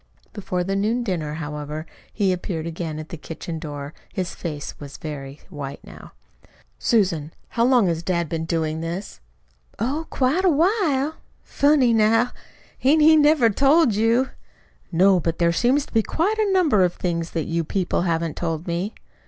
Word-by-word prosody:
Before 185 -4 -2
the 195 +2 -2
noon 220 +5 0
dinner, 160 -8 -2
however, 150 0 -5 0.3
he 195 -4 +1
appeared 175 -3 -4
again 165 -2 -4
at 155 0 -7
the 170 - -6
kitchen 165 +1 -7
door. 145 -2 -7 0.2
His 185 -2 -3
face 150 -4 -5
was 145 -1 -9
very 145 -2 -7
white 140 -2 -6
now. - - -13 0.7
"Susan, 175 -9 +1 0.2
how 230 0 +1
long 250 -4 +4
has 165 -2 0
dad 170 -1 -1
been 160 +1 -3
doing 160 -1 -1
this?" 170 - -5 0.6
"Oh, 280 +9 -2
quite 275 +8 +1
a 375 - +5
while. 320 -3 +1 0.3
Funny, 280 -4 +3
now! 225 +2 +3 0.5
Hain't 300 +4 +4
he 315 +1 +8 0.2
ever 255 -8 +4
told 275 +2 +4
you?" 230 +5 +2 0.6
"No. 185 +2 +4
But 165 0 -2
there 170 -1 +3
seem 245 +10 +2
to 290 - -4
be 225 - +4
quite 390 - -1
a 420 -2 +2
number 315 - +4
of 175 -1 +1
things 170 -2 -2
that 165 -2 -1
you 165 0 -1
people 180 +2 -1
haven't 165 -3 -1
told 165 -1 -3
me." 175 +5 -3
185 Hz, 170 wpm, -23 LUFS, 165-250 Hz, 0.7 s, he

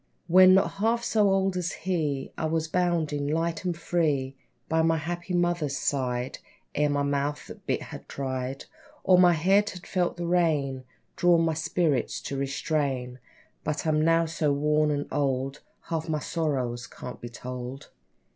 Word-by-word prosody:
When 185 +1 +7
not 195 - +3
half 230 +3 +1
so 215 -3 +3
old 195 -1 +2
as 180 0 -2
he, 155 -6 -2
I - - -2
was 160 0 0
bounding, 160 -5 0
light 165 +2 -1
and 175 -2 -1
free, 150 -6 0 0.3
By 160 0 +2
my 165 0 +3
happy 175 +3 -3
mother's 175 -5 0
side, 125 -2 -1 0.3
Ere 150 0 +2
my 145 0 +1
mouth 140 +1 -1
the - - -8
bit - - -3
had - - -10
tried, 130 0 -4 0.4
Or 185 -1 +5
my 180 -1 +7
head 195 +6 +3
had 180 -1 -9
felt 180 -2 -1
the 175 - -3
rein 150 -7 +1 0.3
Drawn, 175 -1 +4
my 160 - +1
spirits 160 -4 0
to 140 - -5
restrain. 135 -2 -2 0.4
But 150 +1 -2
I'm 155 -1 +2
now 165 +1 +4
so 160 -2 0
worn 150 +1 +2
and 145 -1 -1
old, 135 -1 -1 0.2
Half 165 0 -4
my 155 - +1
sorrows 130 -7 -2
can't 125 - -9
be 120 - -6
told. 125 +2 -7
155 Hz, 165 wpm, -27 LUFS, 140-175 Hz, 0.4 s, When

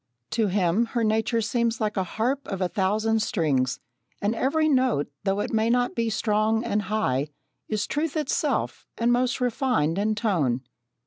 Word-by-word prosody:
To 225 -2 +1
him 190 +3 +2
her 235 - +2
nature 220 +2 +1
seems 230 0 0
like 215 -1 -1
a 190 - +1
harp 245 +9 -2
of 195 - -4
a 185 - +1
thousand 215 +4 +1
strings, 145 - 0 0.4
and 205 +2 0
every 295 +7 +1
note, 255 - +2
though 195 +1 +1
it - - -4
may 220 +1 +2
not 245 +1 +2
be 230 -1 0
strong 215 +1 +1
and 210 -2 0
high, 190 -10 0 0.4
is 215 -1 -1
truth 305 +1 -2
itself, 300 -3 -1
and 235 +1 +2
most 250 +1 +1
refined 240 - +1
in 215 +1 +1
tone. 165 - 0
220 Hz, 170 wpm, -25 LUFS, 195-240 Hz, 0.4 s, him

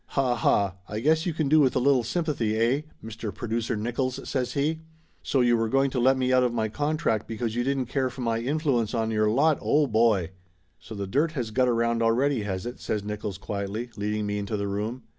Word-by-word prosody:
"Ha 130 -3 +3
ha! 100 -4 +1
I 105 - -3
guess 160 +7 +2
you 170 - 0
can 155 -3 0
do 155 +3 +5
with 135 -4 +3
a - - +3
little 130 -1 +3
sympathy, 125 -7 -1
eh? 120 +6 +2 0.2
Mister 110 -1 -6
Producer 115 0 -2
Nickolls?" 120 +4 -2
says 125 -3 -2
he. 155 +3 0 0.4
"So 135 - +1
you 120 -1 +4
were 115 -1 0
going 135 +2 +2
to 125 - -1
let 130 +2 +4
me 130 0 +1
out 130 - +5
of 125 - +1
my 110 -2 -1
contract 145 -3 -1
because 115 0 -3
you 120 - 0
didn't 135 0 0
care 130 +1 -1
for 125 +1 -9
my 115 -1 0
influence 130 -3 0
on 115 -1 0
your 110 -1 +2
lot! 145 +7 +3
Oh, 150 0 +3
boy 110 - +2 0.2
!" 90 0 -40
"So 95 +6 -10
the 100 -1 -3
dirt 145 - 0
has 120 -7 -3
got 125 +3 +2
around 115 0 +1
already, 120 +3 +2
has 95 -3 -4
it?" 120 - -6
says 105 -2 -2
Nickolls 105 -2 -5
quietly, 100 +4 -4
leading 105 0 -2
me 105 0 -2
into 105 +1 -3
the 100 0 -2
room. 110 +5 -3
120 Hz, 230 wpm, -26 LUFS, 110-135 Hz, 0.4 s, do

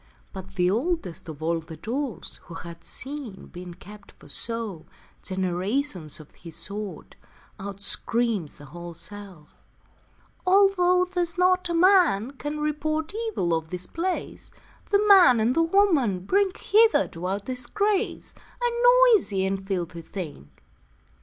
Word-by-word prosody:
But 190 -2 -9
the 180 -1 +2
oldest 220 - -2
of 155 0 -8
all 165 +1 +1
the 160 0 -10
dolls 255 +1 -4
Who 170 - -10
had 170 0 -9
seen, 265 -8 -7
being 180 -1 -8
kept 205 +2 -14
for - - -18
show, 225 -8 -3 0.3
Generations 185 - -1
of 155 - -14
his 165 -2 -10
sort, 205 0 -5 0.4
Out 200 0 -7
screams 220 -6 +1
the 145 - -12
whole 170 +3 -9
shelf: 190 -4 -9 0.9
'Although 365 -1 +4
There's 355 -1 -2
not 365 0 +3
a 340 - 0
man 335 - +4
can 295 +2 -5
report 310 +2 -1
Evil 435 - -1
of 160 -1 -2
this 180 +1 -4
place, 355 - -4 0.4
The 410 0 +3
man 360 - +7
and 230 +4 +2
the 330 - +4
woman 330 - +3
bring 395 - +2
Hither 440 - +4
to 170 +2 -6
our 195 +2 -1
disgrace, 265 - -1 0.3
A 485 0 +1 0.4
noisy 200 - +2
and 190 0 -3
filthy 175 -3 -3
thing.' 160 - -8
215 Hz, 140 wpm, -25 LUFS, -, 0.9 s, man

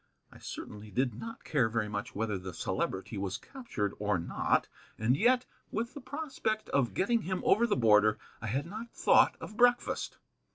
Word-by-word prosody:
I - - -14
certainly 105 0 -7
did 125 +4 0
not 225 - -8
care 130 -7 +2
very 110 -1 0
much 105 -1 -4
whether 105 -2 -1
the 90 -2 -7
Celebrity 95 +5 -2
was 95 -1 -2
captured 180 - -4
or 105 -2 +1
not, 85 - +1 0.3
and 115 +4 +3
yet, 245 - +3 0.3
with 235 +3 -2
the 285 - -8
prospect 260 -7 -3
of 135 -4 +1
getting 230 +4 +2
him 185 -1 -3
over 235 +4 +5
the 210 - +2
border, 110 -2 +5 0.2
I 115 - -4
had 135 +8 -1
not 220 +6 -7
thought - - +5
of 215 - -8
breakfast. 245 +1 +2
125 Hz, 175 wpm, -31 LUFS, -, 0.3 s, over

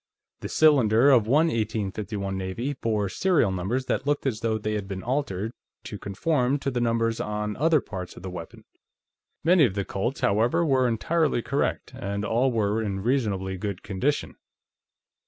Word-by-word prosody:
The - - -6
cylinder 135 -4 +5
of 115 -5 +4
one 150 +7 +4
1851 105 - -2
Navy 95 +9 -3
bore 110 -6 -1
serial 145 - +2
numbers 100 +8 -2
that 135 - -2
looked 145 0 0
as 120 -6 -1
though 110 -1 0
they 110 0 -3
had 105 -2 -3
been 95 -1 -5
altered 115 -5 -2 0.3
to 105 -4 -7
conform 125 +6 0
to 135 -1 -3
the 125 -1 -1
numbers 115 -1 +1
on 105 0 -3
other 155 +2 +4
parts 95 -4 -7
of - - -11
the 95 - -5
weapon. 85 -2 -9 0.8
Many 175 0 +5
of 105 -8 +2
the 100 -1 -1
Colts, 120 +7 -3
however, 115 +11 +2
were 130 -4 +3
entirely 135 +2 +1
correct, - - -1
and 100 +1 -4
all 120 +5 +2
were 110 -1 0
in 100 -3 -3
reasonably 100 -7 0
good 100 -2 -4
condition. 130 +9 -2
110 Hz, 170 wpm, -26 LUFS, 100-130 Hz, 0.8 s, cylinder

